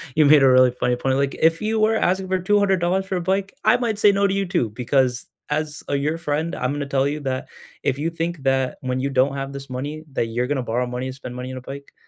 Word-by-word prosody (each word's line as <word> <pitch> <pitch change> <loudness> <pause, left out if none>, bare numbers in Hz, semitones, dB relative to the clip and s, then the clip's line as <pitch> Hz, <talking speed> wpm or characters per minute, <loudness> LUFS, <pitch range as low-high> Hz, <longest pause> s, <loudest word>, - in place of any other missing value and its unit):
you 155 - +5
made 145 -1 +7
a 135 - +6
really 130 0 +6
funny 125 0 0
point. 130 +1 0
Like, 140 0 0
"If 165 0 +3
you 220 +1 0
were 215 +1 +3
asking 190 -2 +1
for 185 0 0
$200 190 -1 +2
for 190 - -3
a 180 - -1
bike, 190 +2 -1
I 215 +3 +5
might 230 -4 -1
say 205 -1 +5
no 200 0 +2
to 195 - -1
you 195 0 0
too, 125 -10 0
because 125 +2 0 0.2
as, 150 0 -3
uh, - - -1
your 150 +3 0
friend, 160 0 -2
I'm 125 +2 -1
gonna 145 -1 -3
tell 140 0 +1
you 150 +2 -2
that 130 -2 -3 0.4
if 130 - 0
you 160 +3 -1
think 165 0 -3
that 135 -1 +1
when 130 -1 -2
you 140 +2 -1
don't 135 +1 +2
have 135 0 -4
this 140 0 -8
money, 145 +5 -5
that 120 - 0
you're 120 +2 -2
going 145 - 0
to 130 - -2
borrow 125 +1 -1
money 125 +1 -4
and 130 - -5
spend 125 -2 -8
money 125 +1 -6
on 130 - -6
a 130 - -7
bike, 140 +2 -9
145 Hz, 275 wpm, -22 LUFS, 130-180 Hz, 0.4 s, made